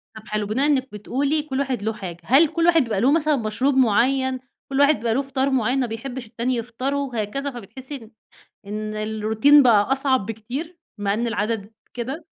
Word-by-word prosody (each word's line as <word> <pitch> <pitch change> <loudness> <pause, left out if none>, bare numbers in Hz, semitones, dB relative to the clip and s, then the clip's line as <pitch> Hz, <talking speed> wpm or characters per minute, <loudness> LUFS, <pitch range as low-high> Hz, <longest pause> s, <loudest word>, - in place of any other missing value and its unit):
طب 220 0 -12
حلو، 210 0 -2
بناءً 245 +7 0
إنِّك 270 -3 +1
بتقولي 275 +9 -1
كلّ 275 -3 -4
واحد 265 -5 -1
له 220 +1 -1
حاجة، 185 -6 -7
هل 275 - +5
كلّ 330 +3 -1
واحد 335 -2 +5
بيبقى 215 -5 -2
له 260 +4 +4
مثلًا 305 -1 +2
مشروب 255 +3 0
معيّن، 260 +2 +2 0.3
كلّ 275 0 -1
واحد 285 +2 +5
بيبقى 230 -1 -1
له 265 - +1
فطار 270 0 -1
معيّن 255 0 +1
ما 255 - 0
بيحبش 245 +3 -6
التاني 235 +3 -2
يفطره، 255 +4 -3
هكذا 275 +7 -2
فبتحسّي 250 +4 -8
إن 225 -4 -11 0.5
إن 215 +1 -5
الروتين 220 +6 +4
بقى 220 -2 +4
أصعب 265 -5 +2
بكتير، 245 - -6 0.2
مع 200 -1 0
إن 235 +3 -1
العدد 220 -1 -2 0.2
كده؟ 260 +7 -5
250 Hz, 190 wpm, -22 LUFS, 215-275 Hz, 0.5 s, هل